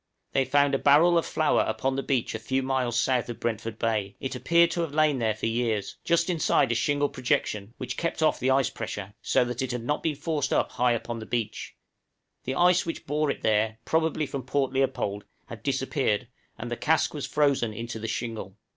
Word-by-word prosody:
They 135 Hz, -1 st, +2 dB
found 140 Hz, +2 st, +3 dB
a 135 Hz, -, +2 dB
barrel 155 Hz, +5 st, +5 dB
of 165 Hz, -, +2 dB
flour 155 Hz, -1 st, +2 dB
upon 120 Hz, +5 st, -1 dB
the 135 Hz, -, -1 dB
beach 130 Hz, -4 st, -1 dB
a 110 Hz, -, -3 dB
few 130 Hz, +4 st, -1 dB
miles 130 Hz, -3 st, 0 dB
south 130 Hz, -1 st, +1 dB
of 120 Hz, -, -6 dB
Brentford 115 Hz, -1 st, -3 dB
Bay; 110 Hz, -4 st, -1 dB
it 135 Hz, -, -4 dB
appeared 170 Hz, +6 st, +3 dB
to 170 Hz, -, -1 dB
have 155 Hz, -3 st, -3 dB
lain 155 Hz, -3 st, +3 dB
there 110 Hz, -2 st, +1 dB
for 110 Hz, -, -4 dB
years, 115 Hz, -3 st, -1 dB
just 170 Hz, 0 st, +2 dB
inside 165 Hz, -8 st, +2 dB
a -, -, +3 dB
shingle 145 Hz, +4 st, +1 dB
projection, 115 Hz, -5 st, -2 dB
which 130 Hz, -, -5 dB
kept 170 Hz, -1 st, -1 dB
off 155 Hz, -, +3 dB
the 130 Hz, -, +1 dB
ice 135 Hz, 0 st, +3 dB
pressure, 105 Hz, -3 st, -6 dB
so -, -, +2 dB
that 120 Hz, 0 st, -4 dB
it 130 Hz, -, -2 dB
had 120 Hz, -1 st, -3 dB
not 145 Hz, +5 st, -1 dB
been 160 Hz, -2 st, -1 dB
forced 150 Hz, -1 st, -2 dB
up -, -, +1 dB
high 125 Hz, 0 st, +2 dB
upon 120 Hz, 0 st, -4 dB
the 110 Hz, -, -8 dB
beach; 115 Hz, -3 st, -3 dB, 0.7 s
the 130 Hz, -, -2 dB
ice 180 Hz, +1 st, +4 dB
which 165 Hz, -, -5 dB
bore 150 Hz, +1 st, 0 dB
it -, -, -3 dB
there 110 Hz, 0 st, +2 dB
probably 160 Hz, -1 st, +1 dB
from 140 Hz, -1 st, -4 dB
Port 130 Hz, +1 st, -1 dB
Leopold 130 Hz, -7 st, -1 dB, 0.2 s
had -, -, -9 dB
disappeared, -, -, 0 dB, 0.3 s
and -, -, -6 dB
the -, -, 0 dB
cask -, -, +2 dB
was -, -, -4 dB
frozen 140 Hz, -6 st, +2 dB
into 115 Hz, +1 st, -6 dB
the 115 Hz, -, -4 dB
shingle. 110 Hz, -3 st, -4 dB
130 Hz, 215 wpm, -27 LUFS, 115-145 Hz, 0.7 s, barrel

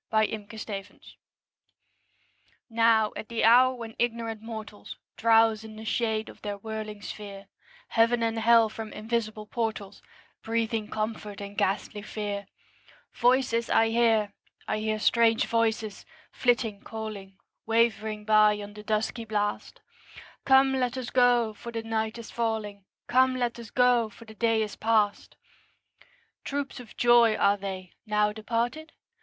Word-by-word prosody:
TWILIGHT 215 Hz, -1 st, 0 dB
VOICES 205 Hz, -2 st, -8 dB, 1.5 s
Now, 225 Hz, -1 st, +3 dB
at 215 Hz, -, -7 dB
the 230 Hz, -1 st, -1 dB
hour 255 Hz, +3 st, +6 dB
when 230 Hz, -2 st, -8 dB
ignorant 230 Hz, -2 st, -2 dB
mortals 220 Hz, -2 st, -8 dB, 0.2 s
Drowse 225 Hz, -1 st, +4 dB
in 220 Hz, -1 st, -10 dB
the 220 Hz, +1 st, -9 dB
shade 220 Hz, -1 st, -1 dB
of -, -, -13 dB
their 205 Hz, -1 st, -4 dB
whirling 215 Hz, 0 st, -6 dB
sphere, 200 Hz, -1 st, -8 dB, 0.4 s
Heaven 230 Hz, +1 st, +3 dB
and 225 Hz, 0 st, 0 dB
Hell 230 Hz, 0 st, +5 dB
from 220 Hz, 0 st, -7 dB
invisible 215 Hz, -1 st, -3 dB
portals 215 Hz, -3 st, -4 dB, 0.4 s
Breathing 225 Hz, -1 st, -1 dB
comfort 215 Hz, -1 st, -4 dB
and 200 Hz, 0 st, -8 dB
ghastly 205 Hz, +2 st, -1 dB
fear, 205 Hz, -1 st, -5 dB, 0.7 s
Voices 245 Hz, -2 st, +2 dB
I 225 Hz, 0 st, +4 dB
hear; 225 Hz, -3 st, +2 dB, 0.3 s
I 215 Hz, -, -1 dB
hear 215 Hz, 0 st, -1 dB
strange 225 Hz, +1 st, +3 dB
voices, 225 Hz, -2 st, -1 dB, 0.3 s
flitting, 235 Hz, -4 st, 0 dB
calling, 215 Hz, -3 st, -7 dB, 0.3 s
Wavering 220 Hz, -2 st, +1 dB
by 215 Hz, -1 st, +5 dB
on 205 Hz, 0 st, -8 dB
the 210 Hz, -, -10 dB
dusky 215 Hz, +2 st, -2 dB
blast, 210 Hz, -1 st, -3 dB, 0.6 s
'Come, 265 Hz, 0 st, +5 dB
let 250 Hz, 0 st, -1 dB
us 255 Hz, -2 st, -5 dB
go, 245 Hz, -3 st, +3 dB
for 235 Hz, +3 st, -9 dB
the 225 Hz, -1 st, -4 dB
night 220 Hz, 0 st, -2 dB
is 235 Hz, -, -9 dB
falling; 215 Hz, -4 st, -3 dB, 0.2 s
Come, 260 Hz, +1 st, +3 dB
let 240 Hz, -2 st, -2 dB
us 230 Hz, -2 st, -9 dB
go, 245 Hz, -2 st, +3 dB
for 230 Hz, +2 st, -15 dB
the 220 Hz, -, -12 dB
day 225 Hz, 0 st, +1 dB
is 210 Hz, -, -6 dB
past!' 215 Hz, -2 st, 0 dB, 1.1 s
Troops 280 Hz, -1 st, -4 dB
of 240 Hz, -3 st, -13 dB
joys 240 Hz, -2 st, +5 dB
are 200 Hz, -, +4 dB
they, 190 Hz, -2 st, -6 dB
now 210 Hz, 0 st, +2 dB
departed? 235 Hz, +8 st, -3 dB
220 Hz, 140 wpm, -27 LUFS, 210-235 Hz, 1.5 s, hour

